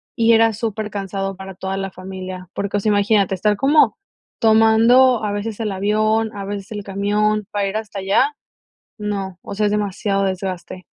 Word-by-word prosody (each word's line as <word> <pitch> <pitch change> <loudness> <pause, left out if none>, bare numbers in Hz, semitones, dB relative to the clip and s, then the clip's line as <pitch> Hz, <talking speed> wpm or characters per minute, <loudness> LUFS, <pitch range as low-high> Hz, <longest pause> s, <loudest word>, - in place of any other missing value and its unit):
y 230 0 +4
era 225 0 +5
supercansado 200 -3 -3
para 190 0 -8
toda 190 +1 -4
la 195 0 -3
familia, 185 -1 -8
porque, 200 0 -2
o - - +1
sea, 215 - 0
imagínate, 205 -1 +2
estar 210 +3 +1
como 270 -4 +4 0.4
tomando 225 +3 +5
a 210 - -1
veces 205 +1 -4
el 220 -2 -2
avión, 215 +3 0
a 200 - -5
veces 200 0 -6
el 210 -1 -5
camión, 205 +2 0
para 205 -1 0
ir 195 +2 -2
hasta 210 -2 -6
allá, 255 +10 +2 0.6
no, 200 -3 -4
o - - -7
sea 210 +1 +1
es 205 - 0
demasiado 200 -1 0
desgaste. 185 -1 -4
205 Hz, 175 wpm, -20 LUFS, 195-220 Hz, 0.6 s, era